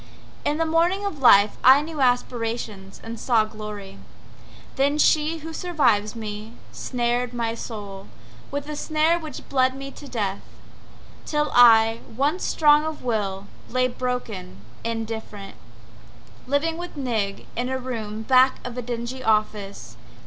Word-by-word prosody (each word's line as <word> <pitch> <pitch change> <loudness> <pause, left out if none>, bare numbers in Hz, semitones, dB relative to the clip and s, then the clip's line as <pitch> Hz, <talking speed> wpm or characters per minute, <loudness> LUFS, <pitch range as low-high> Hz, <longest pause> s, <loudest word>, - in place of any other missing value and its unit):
In 295 - 0
the 325 - +1
morning 340 +5 +1
of 370 -8 -4
life 205 -4 +6
I 265 +3 +7
knew 310 -2 -5
aspiration 230 -5 -1
and 225 0 -7
saw 230 -4 +3
glory, 210 -2 -8 0.8
The 280 +2 +2
she, 310 +1 +3
who 320 +1 -8
survives 245 - +1
me, 215 0 -6 0.2
snared 245 0 -2
my 230 -1 -1
soul 205 -4 -7 0.4
With 285 +1 -4
a 300 - -4
snare 310 +3 +1
which 310 -5 -9
bled 260 -1 +2
me 275 0 -7
to 290 - -12
death, 200 -6 -2 0.9
Till 300 0 0
I, 225 -2 +7 0.2
once 290 +8 0
strong 300 -1 +4
of 315 -1 -5
will, 200 -5 -2 0.2
lay 255 +1 +2
broken, 240 - -4 0.2
indifferent, 225 -3 -5 0.9
Living 320 +5 0
with 350 -3 -7
Nig 220 -7 -2
in 245 +2 -2
a 260 - -1
room 220 -4 -5
back 260 +2 +5
of 245 -1 -5
a - - -2
dingy 240 +2 -5
office. 200 - -1
245 Hz, 140 wpm, -24 LUFS, 215-285 Hz, 0.9 s, I